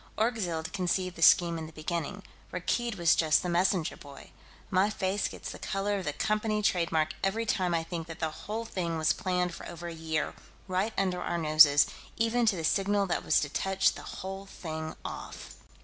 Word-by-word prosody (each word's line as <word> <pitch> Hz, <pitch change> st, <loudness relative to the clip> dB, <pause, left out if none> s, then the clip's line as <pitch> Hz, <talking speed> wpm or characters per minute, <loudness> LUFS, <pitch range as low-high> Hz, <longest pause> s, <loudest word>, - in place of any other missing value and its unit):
Orgzild 195 Hz, -8 st, -1 dB
conceived 185 Hz, -1 st, -1 dB
the -, -, -9 dB
scheme 170 Hz, 0 st, +6 dB
in 160 Hz, -, -6 dB
the -, -, -11 dB
beginning; 165 Hz, +4 st, -4 dB, 0.3 s
Rakkeed 235 Hz, +5 st, -1 dB
was 170 Hz, -3 st, +4 dB
just 155 Hz, -2 st, +3 dB
the 180 Hz, -, -2 dB
messenger 175 Hz, -1 st, +1 dB
boy. 140 Hz, -1 st, -13 dB, 0.4 s
My 190 Hz, +2 st, +3 dB
face 195 Hz, -1 st, -1 dB
gets -, -, -7 dB
the -, -, -9 dB
color 200 Hz, 0 st, -1 dB
of 185 Hz, -, -6 dB
the 150 Hz, -, -1 dB
Company 215 Hz, +2 st, 0 dB
trademark 165 Hz, -6 st, +1 dB
every 220 Hz, +4 st, 0 dB
time 185 Hz, -5 st, +1 dB
I 165 Hz, -, 0 dB
think 165 Hz, -1 st, -5 dB
that 165 Hz, 0 st, -8 dB
the 160 Hz, -1 st, -1 dB
whole 220 Hz, +8 st, -5 dB
thing 170 Hz, -6 st, -2 dB
was 155 Hz, -1 st, +3 dB
planned 180 Hz, -1 st, -1 dB
for -, -, -8 dB
over 175 Hz, 0 st, -7 dB
a 170 Hz, -, -5 dB
year, 160 Hz, -1 st, -2 dB, 0.3 s
right 190 Hz, +4 st, 0 dB
under 185 Hz, -2 st, 0 dB
our 175 Hz, -, -1 dB
noses, 155 Hz, -2 st, +7 dB, 0.3 s
even 230 Hz, +1 st, +2 dB
to 210 Hz, -, +4 dB
the 165 Hz, -, -4 dB
signal 200 Hz, +4 st, +2 dB
that 180 Hz, -, -1 dB
was -, -, +4 dB
to 150 Hz, -, -2 dB
touch 195 Hz, +5 st, +1 dB
the -, -, -9 dB
whole 195 Hz, +1 st, -7 dB
thing 160 Hz, -4 st, -6 dB
off...." -, -, -7 dB
180 Hz, 195 wpm, -29 LUFS, 165-195 Hz, 0.4 s, noses